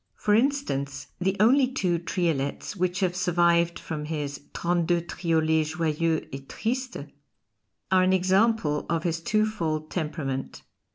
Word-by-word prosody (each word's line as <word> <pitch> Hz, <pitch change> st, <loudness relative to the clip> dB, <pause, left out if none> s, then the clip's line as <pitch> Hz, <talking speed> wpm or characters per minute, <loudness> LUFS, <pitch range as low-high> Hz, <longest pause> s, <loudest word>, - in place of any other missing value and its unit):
For 210 Hz, -, +1 dB
instance, 210 Hz, -, 0 dB
the 190 Hz, +2 st, +1 dB
only 255 Hz, +5 st, +5 dB
two 185 Hz, -10 st, 0 dB
triolets 165 Hz, -3 st, -2 dB
which 185 Hz, 0 st, -1 dB
have 180 Hz, -2 st, +1 dB
survived 170 Hz, -2 st, +2 dB
from 150 Hz, -2 st, -5 dB
his 150 Hz, -2 st, -4 dB
"Trente 170 Hz, -1 st, 0 dB
deux 175 Hz, -1 st, +2 dB
Triolets 160 Hz, -2 st, 0 dB
joyeux 160 Hz, 0 st, 0 dB
and 135 Hz, 0 st, -8 dB
tristes" 255 Hz, +3 st, -3 dB, 0.9 s
are 185 Hz, -1 st, +5 dB
an 185 Hz, 0 st, +3 dB
example 190 Hz, -4 st, +2 dB
of 165 Hz, -1 st, 0 dB
his 165 Hz, -2 st, -1 dB
twofold 170 Hz, -7 st, -1 dB
temperament. 150 Hz, -5 st, -4 dB
170 Hz, 130 wpm, -26 LUFS, 155-190 Hz, 0.9 s, only